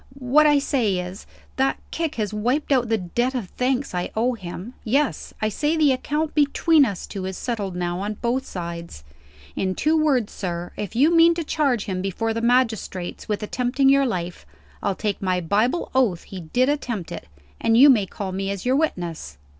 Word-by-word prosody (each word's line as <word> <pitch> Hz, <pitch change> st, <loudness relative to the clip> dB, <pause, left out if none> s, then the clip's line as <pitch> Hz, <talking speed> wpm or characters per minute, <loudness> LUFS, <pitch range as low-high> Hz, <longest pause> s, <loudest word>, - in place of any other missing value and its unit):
What 275 Hz, +4 st, +4 dB
I 295 Hz, -1 st, +5 dB
say 245 Hz, -9 st, +1 dB
is 180 Hz, +2 st, -6 dB, 0.3 s
that 270 Hz, +1 st, +2 dB
kick 325 Hz, -2 st, -2 dB
has 215 Hz, -2 st, -2 dB
wiped 245 Hz, +9 st, -1 dB
out 250 Hz, -4 st, +3 dB
the 225 Hz, -, +2 dB
debt 240 Hz, +8 st, -1 dB
of 220 Hz, -8 st, -3 dB
thanks 255 Hz, 0 st, -1 dB
I 180 Hz, 0 st, -2 dB
owe 240 Hz, +3 st, +1 dB
him. 195 Hz, +2 st, -7 dB
Yes. 275 Hz, +5 st, 0 dB
I 215 Hz, -, +2 dB
say 300 Hz, +9 st, 0 dB
the 300 Hz, -3 st, +4 dB
account 295 Hz, +4 st, -1 dB
between 300 Hz, +1 st, +4 dB
us 200 Hz, -6 st, -4 dB
two 195 Hz, -2 st, -6 dB
is 190 Hz, -, -5 dB
settled 205 Hz, -7 st, -3 dB
now, 175 Hz, 0 st, -2 dB
on 205 Hz, +2 st, -3 dB
both 245 Hz, +4 st, -1 dB
sides. 170 Hz, -, -7 dB, 0.5 s
In 185 Hz, -1 st, -1 dB
two 310 Hz, +1 st, +2 dB
words, 280 Hz, -8 st, +2 dB
sir, 175 Hz, -2 st, -4 dB
if 210 Hz, +1 st, -5 dB
you 300 Hz, +8 st, +4 dB
mean 335 Hz, 0 st, +6 dB
to 335 Hz, -, -2 dB
charge 275 Hz, -8 st, 0 dB
him 185 Hz, -2 st, -3 dB
before 225 Hz, +4 st, -2 dB
the 230 Hz, -, -2 dB
magistrates 230 Hz, -8 st, 0 dB
with 210 Hz, 0 st, -1 dB
attempting 250 Hz, +5 st, +1 dB
your 275 Hz, 0 st, +4 dB
life, 175 Hz, -5 st, -4 dB, 0.4 s
I'll 200 Hz, -, 0 dB
take 205 Hz, 0 st, -2 dB
my 185 Hz, -2 st, +1 dB
Bible 215 Hz, -, 0 dB
oath 235 Hz, -10 st, +2 dB
he 190 Hz, -, -8 dB
did 245 Hz, +10 st, +1 dB
attempt 240 Hz, -, -2 dB
it, -, -, -7 dB, 0.3 s
and 225 Hz, 0 st, +3 dB
you 275 Hz, +4 st, +9 dB
may 220 Hz, -8 st, +5 dB
call 190 Hz, +1 st, -5 dB
me 195 Hz, +1 st, -3 dB
as 200 Hz, +1 st, -4 dB
your 255 Hz, +1 st, +3 dB
witness. 170 Hz, -, -3 dB
230 Hz, 195 wpm, -23 LUFS, 190-270 Hz, 0.5 s, you